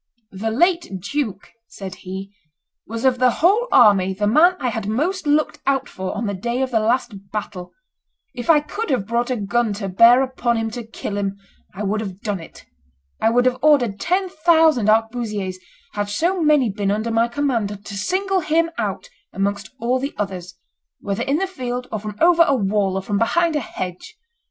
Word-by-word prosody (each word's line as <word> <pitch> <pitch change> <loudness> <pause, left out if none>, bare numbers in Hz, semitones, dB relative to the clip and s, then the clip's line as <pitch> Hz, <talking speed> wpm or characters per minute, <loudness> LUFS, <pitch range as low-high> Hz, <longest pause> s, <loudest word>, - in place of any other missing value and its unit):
"The 200 +4 -3
late 335 - +1
duke," 210 -1 -4 0.2
said 195 -4 -8
he, 190 +2 -8 0.5
"was 230 +3 -4
of 255 -2 +3
the 255 0 +5
whole 400 - +2
army 190 -2 +5
the 205 +2 -1
man 320 - +5
I 255 - -1
had 220 -3 -4
most 310 - -1
looked 300 +1 +1
out 270 -2 +1
for 185 +2 -5
on 230 - -2
the 200 - -2
day 235 +7 -2
of 260 - -3
the 225 - +2
last 215 -3 -1
battle; 195 -4 -5 0.6
if 245 +1 -7
I 305 -3 +6
could 425 +9 -5
have 250 -8 0
brought 235 +3 -1
a 255 - 0
gun 225 +1 0
to 200 -1 -4
bear 235 +7 +6
upon 245 -2 -1
him 225 0 -2
to 240 +1 -6
kill 205 -2 -5
him, 200 -1 -2 0.4
I 205 - -4
would 210 +2 -1
have 195 -3 -6
done 205 -3 -2
it; 165 - -13 0.6
I 225 - +4
would 245 +2 +2
have 255 0 +1
ordered 260 -9 +3
ten 370 +2 0
thousand 320 - +3
arquebusiers, 215 -4 0 0.3
had 205 0 -2
so 345 - 0
many 300 -7 +3
been 200 0 -2
under 215 +3 -1
my 225 +1 +2
command, 230 -6 -2
to 205 - -7
single 375 - 0
him 330 0 +1
out - - -3 0.2
amongst 200 0 -2
all 250 +2 0
the 275 +3 -4
others, 185 -3 -5 0.4
whether 200 +2 -3
in 275 +4 +1
the 385 - 0
field, 250 -9 -5
or 215 - -2
from 210 0 -7
over 340 0 +5
a 275 - +3
wall, 200 -3 0
or 190 - -3
from 200 0 -1
behind 330 +8 +2
a - - +2
hedge. 180 -7 -7
230 Hz, 195 wpm, -21 LUFS, 200-280 Hz, 0.6 s, I